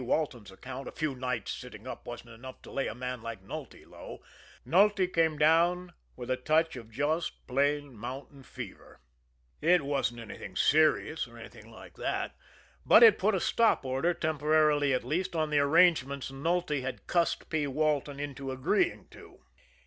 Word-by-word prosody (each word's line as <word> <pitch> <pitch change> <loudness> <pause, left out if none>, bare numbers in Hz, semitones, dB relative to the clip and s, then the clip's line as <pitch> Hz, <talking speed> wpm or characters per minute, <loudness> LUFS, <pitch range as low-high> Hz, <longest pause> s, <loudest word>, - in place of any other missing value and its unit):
Walton's 125 - -2
account 130 +7 -8
a - - -6
few 155 -3 -2
nights 125 -5 -3
sitting 120 -3 -9
up 130 - -8
wasn't 120 -1 -8
enough 130 +3 -11
to - - -12
lay 135 - -1
a 105 - -5
man 125 -1 -5
like 115 -4 -7
Nulty 95 - -9
low - - -11 0.4
Nulty 200 +2 +4
came 165 -3 +1
down 170 +4 +3 0.2
with 125 0 -6
a 130 - +1
touch 155 +4 +1
of 115 -3 -9
just 150 +8 -2
plain 140 0 0
mountain 130 +5 -8
fever. 130 - -10 0.6
It 170 0 +4
wasn't 120 -5 -3
serious, 155 -1 +3
or 120 0 -15
anything 110 0 -12
like 110 - -14
that; - - -3 0.5
but 235 - +7
it 225 -3 +8
put 210 +2 +2
a - - +1
stop 225 -5 +2
order, 135 +7 0
temporarily 150 -2 +2
at 130 - 0
least, 180 +3 -2
on 155 -1 0
the 150 - +3
arrangements 140 -3 +3
Nulty 150 +1 -1
had 130 0 -6
cussed 170 -1 0
P. 155 -2 0
Walton 145 0 -1
into 140 -2 -5
agreeing 130 -1 0
to. - - -16
145 Hz, 165 wpm, -30 LUFS, 125-160 Hz, 0.6 s, it